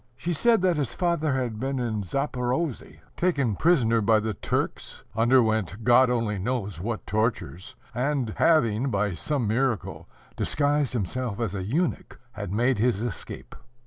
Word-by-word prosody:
She 175 +4 -2
said 225 +4 +3
that 180 -3 +3
his 140 -5 -2
father 170 -5 +1
had 120 -5 -2
been 135 +2 -2
in 115 -4 -1
Zaporozhe, 130 - -2
taken 140 - +1
prisoner 115 - +3
by 110 +1 +4
the 110 0 -2
Turks, - - -3
underwent 110 -3 +2
God 125 +2 +5
only 115 -4 0
knows 105 -5 -3
what 110 +2 -4
tortures, 110 -1 -2 0.2
and 130 -3 -1
having, 130 -6 +3
by 100 -3 0
some 135 - -1
miracle, 120 0 -1 0.3
disguised 145 -2 +1
himself 115 +1 -2
as 115 -5 -1
a 95 - -3
eunuch, 155 - -2
had 100 -4 -6
made 120 +3 +1
his 115 -3 +2
escape. 120 -6 -6
120 Hz, 145 wpm, -26 LUFS, 110-140 Hz, 0.3 s, God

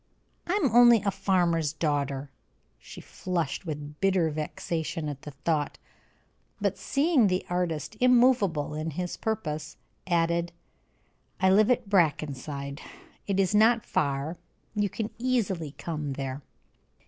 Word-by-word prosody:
"I 350 - 0
am 345 - +2
only 240 -3 +7
a 200 - +1
farmer's 175 -5 +1
daughter." 145 -3 -1 0.5
She - - -11
flushed 175 -2 -3
with 150 -1 -6
bitter 185 -5 +2
vexation 160 +1 -3
at 145 -2 -5
the - - -8
thought, 145 +1 -2 0.8
but - - 0
seeing 280 -5 +2
the 185 -1 0
artist 180 +2 -2
immovable 240 - +3
in 155 +1 -3
his 180 +3 -4
purpose, 155 -9 -3 0.3
added: 170 0 +1 0.9
"I 190 0 +4
live 210 +3 +5
at 245 -4 +1
Brackenside, 145 -5 0 0.5
it 195 -1 0
is 195 +1 +2
not 225 +2 +4
far; 140 +3 -1 0.4
you 205 -2 0
can 215 +3 -4
easily 195 - -1
come 150 -4 -4
there." 135 +1 -4
170 Hz, 125 wpm, -27 LUFS, 150-205 Hz, 0.9 s, only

